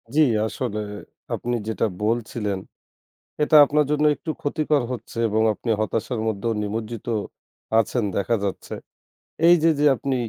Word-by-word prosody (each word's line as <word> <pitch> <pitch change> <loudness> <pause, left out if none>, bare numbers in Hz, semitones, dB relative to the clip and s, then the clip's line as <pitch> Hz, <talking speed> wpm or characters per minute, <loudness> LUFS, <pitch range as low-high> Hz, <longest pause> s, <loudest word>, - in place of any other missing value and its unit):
জি, 155 - +5 0.3
আসলে 110 -2 -3 0.5
আপনি 120 0 -2
যেটা 110 0 0 0.2
বলছিলেন 110 -3 -1 0.8
এটা 150 +1 +5
আপনার 150 +1 +2
জন্য 150 0 +2
একটু 160 - -6
ক্ষতিকর 145 -1 +1
হচ্ছে 120 -1 -7
এবং 110 +1 +1
আপনি 115 - -4
হতাশার 110 +2 -2
মধ্যেও 110 +2 -1
নিমজ্জিত 110 +1 -4 0.7
আছেন 115 +1 -1
দেখা 115 +4 +1
যাচ্ছে। 100 - -4 0.7
এই 175 - +8
যে 165 - +6
যে 150 - +3
আপনি 135 -1 -2
115 Hz, 135 wpm, -23 LUFS, 110-145 Hz, 0.8 s, এই